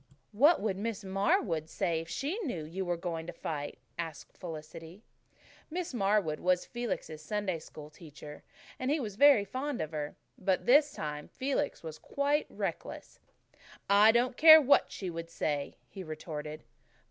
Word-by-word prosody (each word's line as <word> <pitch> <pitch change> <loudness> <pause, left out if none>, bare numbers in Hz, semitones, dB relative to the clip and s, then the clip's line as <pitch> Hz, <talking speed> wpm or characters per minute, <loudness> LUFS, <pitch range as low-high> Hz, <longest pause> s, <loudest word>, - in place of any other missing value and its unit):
"What 290 +11 +5
would 200 -3 -1
Miss 215 0 -3
Marwood 190 -4 0
say 170 -3 -1
if 165 - -11
she 310 - -2
knew 240 - -3
you 180 +5 -4
were 175 -1 -1
going 165 -2 -4
to - - -6
fight?" 145 -2 -5 0.2
asked 165 -3 -6
Felicity. 165 +3 -9 0.7
Miss 345 -2 -4
Marwood 195 -7 +1
was 180 0 +1
Felix' 235 -10 -4
Sunday 190 0 -2
School 155 -1 -11
teacher 150 -1 -11 0.4
and 255 - -1
he 305 +2 +2
was 210 -7 -5
very 275 -4 +6
fond 260 +5 -3
of 155 - -3
her. 150 -1 -4 0.2
But 190 -1 +1
by - - -17
this 285 +4 +5
time 150 -1 -5
Felix 275 -2 -2
was 160 -1 -7
quite 285 +2 0
reckless. - - -5 0.7
"I 205 +2 +7
don't 240 +2 +1
care 315 0 +10
what 285 -2 +4
she 185 -3 -5
would 165 0 -6
say," 145 -3 -2
he 190 - -8
retorted. 155 -1 -6
190 Hz, 160 wpm, -31 LUFS, 160-245 Hz, 0.7 s, care